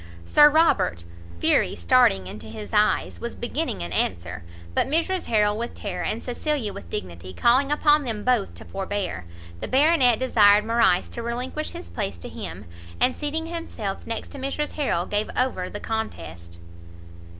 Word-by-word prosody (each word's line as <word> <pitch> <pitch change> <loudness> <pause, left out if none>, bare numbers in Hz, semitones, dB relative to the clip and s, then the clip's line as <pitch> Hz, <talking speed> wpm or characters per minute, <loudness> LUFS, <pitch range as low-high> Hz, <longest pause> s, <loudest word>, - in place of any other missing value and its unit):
Sir 295 - +7
Robert, 295 - +2 0.3
fury - - +2
starting 95 +2 +3
into 100 +3 -9
his 215 -1 -8
eyes, 210 0 +2
was 235 - -4
beginning 260 - -3
an 85 -1 -6
answer; 85 -1 -2 0.3
but - - +1
Mrs 335 +5 0
Harrel 210 -2 +2
with 235 +2 -4
terror, 185 -4 -4
and 225 - -3
Cecilia 250 -3 -2
with 85 - -10
dignity, 90 +1 -6
calling 260 +4 +3
upon 295 0 +4
them 220 -5 -3
both 245 -5 +1
to - - -11
forbear, 195 - -4 0.3
the - - -4
Baronet 265 -3 +4
desired 210 -4 +5
Morrice 225 -6 +3
to 235 - -6
relinquish 250 +6 -3
his 85 - -9
place 85 - -3
to 85 - -7
him, - - -7 0.3
and 255 - +2
seating 315 +2 -3
himself 330 - -5
next 230 -1 -4
to 280 - -9
Mrs 275 +3 -2
Harrel, 220 - -1
gave 210 +1 -1
over 220 -8 0
the 205 - -6
contest. 85 - -5
225 Hz, 160 wpm, -24 LUFS, 175-275 Hz, 0.3 s, Sir